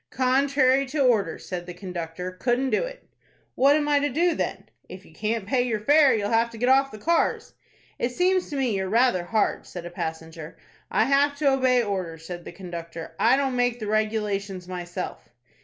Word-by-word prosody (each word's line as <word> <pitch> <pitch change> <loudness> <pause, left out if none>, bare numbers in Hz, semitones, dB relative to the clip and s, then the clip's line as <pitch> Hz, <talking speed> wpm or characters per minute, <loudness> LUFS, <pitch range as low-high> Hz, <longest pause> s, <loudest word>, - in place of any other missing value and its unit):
"Contrary 265 +1 +2
to 290 +4 -4
orders," 245 -7 +1
said 180 -1 -5
the 180 - -7
conductor. 180 -1 -6
"Couldn't 245 +7 -1
do - - +2
it." - - -7 0.5
"What 275 +3 +4
am 300 -1 0
I 290 -1 +3
to 290 +1 0
do 335 +6 +2
then?" - - -3 0.2
"If 185 +2 -10
you - - -18
can't 215 +3 -2
pay 245 +5 +1
your 235 -3 -1
fare, 285 +5 +5
you'll 205 -1 0
have 230 +1 +3
to 230 - -11
get 245 +3 +1
off 270 +1 +4
the 215 - -10
cars." 335 +9 0 0.5
"It 240 - 0
seems 365 +7 +1
to 295 - -5
me 255 -6 0
you're 190 -1 -2
rather 225 -5 +2
hard," 215 +4 0
said 175 -2 -8
a 175 - -7
passenger. 160 -1 -6 0.3
"I - - +2
have 285 +1 +3
to 285 -2 +3
obey 255 -2 +3
orders," 180 -6 -4
said 175 0 -7
the - - -7
conductor. 170 -2 -8
"I 240 +4 +4
don't 270 -2 0
make 245 -1 +1
the 215 - -5
regulations 210 -3 -1
myself." 180 -7 -6
225 Hz, 200 wpm, -25 LUFS, 185-270 Hz, 0.5 s, fare